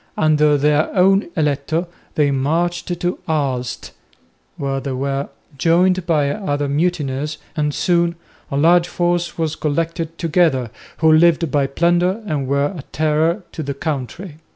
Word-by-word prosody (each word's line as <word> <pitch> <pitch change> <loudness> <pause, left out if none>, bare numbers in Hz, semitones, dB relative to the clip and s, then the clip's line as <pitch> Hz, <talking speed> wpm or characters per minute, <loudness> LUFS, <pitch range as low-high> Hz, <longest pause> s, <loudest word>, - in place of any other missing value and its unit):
Under 150 -1 +3
their 150 +2 +2
own 195 0 +3
"eletto" 150 +2 0 0.3
they 145 -2 +2
marched 165 +6 0
to 175 0 -2
Aalst, 135 -6 -2 0.7
where 135 -1 -2
they 135 0 -4
were 135 +2 -2 0.3
joined 180 +3 +2
by 150 -4 +2
other 145 -8 -2
mutineers, 150 -1 -1 0.2
and 150 -1 0
soon 170 +2 +1 0.3
a 140 - -2
large 170 +3 +4
force 175 0 -1
was 160 -2 -1
collected 165 +2 -2
together, 155 -8 +1 0.3
who 160 -1 +4
lived 165 -1 +4
by 140 -1 +2
plunder 175 +8 +1
and 145 -8 -2
were 140 +5 +1
a 160 - -6
terror 155 +5 +1
to 160 - -6
the 140 -2 -4
country. 155 +3 -5
155 Hz, 140 wpm, -19 LUFS, 140-170 Hz, 0.7 s, large